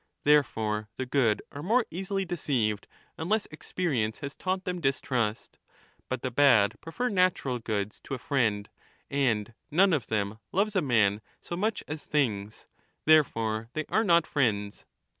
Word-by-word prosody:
Therefore 110 Hz, -8 st, +2 dB
the 130 Hz, -, -3 dB
good 125 Hz, -5 st, +1 dB
are 145 Hz, -, -7 dB
more 225 Hz, +8 st, +2 dB
easily 195 Hz, +2 st, -2 dB
deceived 125 Hz, -, -1 dB, 0.3 s
unless 210 Hz, +7 st, 0 dB
experience 140 Hz, -9 st, -2 dB
has 140 Hz, -1 st, -6 dB
30 -, -, -22 dB
taught 185 Hz, 0 st, 0 dB
them 180 Hz, -2 st, -3 dB
distrust. 125 Hz, -5 st, -1 dB, 0.5 s
But 130 Hz, -, -3 dB
the 130 Hz, -, -2 dB
bad 120 Hz, -6 st, +5 dB
prefer 245 Hz, +10 st, -2 dB
natural 180 Hz, -10 st, +1 dB
goods 105 Hz, -2 st, -3 dB
to 135 Hz, -, -3 dB
a -, -, -5 dB
friend 115 Hz, -8 st, 0 dB, 0.4 s
and 120 Hz, -6 st, +1 dB, 0.2 s
none 185 Hz, +5 st, +4 dB
of 145 Hz, -6 st, 0 dB
them 105 Hz, 0 st, -2 dB
loves 205 Hz, +3 st, +1 dB
a 190 Hz, -, +3 dB
man 105 Hz, -6 st, +2 dB, 0.2 s
so 170 Hz, -, -6 dB
much 215 Hz, +5 st, -1 dB
as 155 Hz, 0 st, -5 dB
things; 110 Hz, -9 st, -1 dB, 0.4 s
therefore 115 Hz, -8 st, +3 dB
they 155 Hz, 0 st, -2 dB
are 220 Hz, -, +2 dB
not 170 Hz, -5 st, +4 dB
friends. 105 Hz, -9 st, -1 dB
135 Hz, 155 wpm, -28 LUFS, 110-170 Hz, 0.5 s, bad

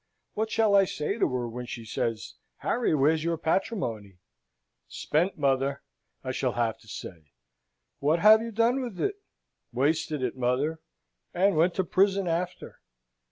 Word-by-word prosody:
What 220 Hz, +1 st, -1 dB
shall 220 Hz, -2 st, +2 dB
I 195 Hz, -1 st, +6 dB
say 185 Hz, +6 st, -3 dB
to -, -, +2 dB
her, 125 Hz, -1 st, -2 dB
when 120 Hz, +1 st, -7 dB
she 115 Hz, -1 st, -7 dB
says, 110 Hz, 0 st, -3 dB, 0.2 s
'Harry, 235 Hz, -9 st, 0 dB
where's 155 Hz, +3 st, +2 dB
your 170 Hz, 0 st, 0 dB
patrimony?' 120 Hz, -, -2 dB, 0.7 s
'Spent, 170 Hz, +6 st, -1 dB
mother,' 140 Hz, -1 st, 0 dB, 0.4 s
I 130 Hz, -, -3 dB
shall 130 Hz, -2 st, -1 dB
have 115 Hz, -2 st, -1 dB
to 110 Hz, -, -21 dB
say. 80 Hz, -8 st, -9 dB, 0.7 s
'What 150 Hz, +4 st, +2 dB
have 215 Hz, +5 st, +7 dB
you 230 Hz, -, -4 dB
done 230 Hz, +4 st, +2 dB
with 235 Hz, -8 st, -6 dB
it?' 405 Hz, 0 st, -2 dB, 0.5 s
'Wasted 145 Hz, +2 st, 0 dB
it, 125 Hz, -, -2 dB
mother, 130 Hz, +6 st, 0 dB, 0.6 s
and 195 Hz, +1 st, +3 dB
went 170 Hz, +3 st, +3 dB
to 190 Hz, -, +1 dB
prison 195 Hz, +2 st, +2 dB
after.' 175 Hz, +2 st, -3 dB
155 Hz, 155 wpm, -27 LUFS, 125-195 Hz, 0.7 s, have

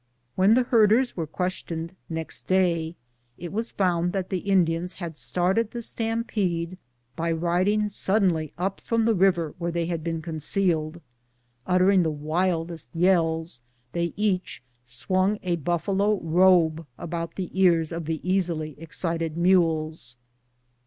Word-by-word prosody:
When 195 Hz, -, +4 dB
the 255 Hz, -, +4 dB
herders 235 Hz, +1 st, +3 dB
were 165 Hz, -3 st, -3 dB
questioned 170 Hz, 0 st, -4 dB
next 160 Hz, -1 st, -5 dB
day, 170 Hz, -3 st, +1 dB, 0.4 s
it 175 Hz, +1 st, -7 dB
was 225 Hz, +3 st, -2 dB
found 175 Hz, -2 st, 0 dB
that 190 Hz, -2 st, -2 dB
the 185 Hz, -, 0 dB
Indians 180 Hz, -2 st, +1 dB
had 170 Hz, -4 st, -7 dB
started 185 Hz, +8 st, +1 dB
the 235 Hz, -, -6 dB
stampede 200 Hz, -7 st, -2 dB, 0.4 s
by 165 Hz, +1 st, -1 dB
riding 180 Hz, +6 st, +1 dB
suddenly 190 Hz, -6 st, +1 dB
up 190 Hz, +2 st, -2 dB
from 230 Hz, -1 st, 0 dB
the 230 Hz, -, +3 dB
river 175 Hz, -5 st, +2 dB
where 170 Hz, 0 st, -2 dB
they 170 Hz, 0 st, -1 dB
had 165 Hz, -2 st, -3 dB
been 165 Hz, -1 st, -2 dB
concealed. 160 Hz, 0 st, -1 dB, 0.7 s
Uttering 185 Hz, +1 st, +4 dB
the 165 Hz, -, +1 dB
wildest 165 Hz, +2 st, -2 dB
yells, 165 Hz, -5 st, +1 dB, 0.3 s
they 170 Hz, +2 st, -1 dB
each 195 Hz, -9 st, -1 dB, 0.2 s
swung 185 Hz, -, 0 dB
a 175 Hz, -2 st, 0 dB
buffalo 195 Hz, +6 st, 0 dB
robe 165 Hz, -1 st, +4 dB
about 170 Hz, 0 st, -5 dB
the 185 Hz, -3 st, -4 dB
ears 175 Hz, -4 st, +3 dB
of 165 Hz, -1 st, -4 dB
the 160 Hz, +2 st, -4 dB
easily 170 Hz, -5 st, 0 dB
excited 165 Hz, 0 st, -3 dB
mules. 160 Hz, -6 st, +1 dB
175 Hz, 135 wpm, -25 LUFS, 165-190 Hz, 0.7 s, When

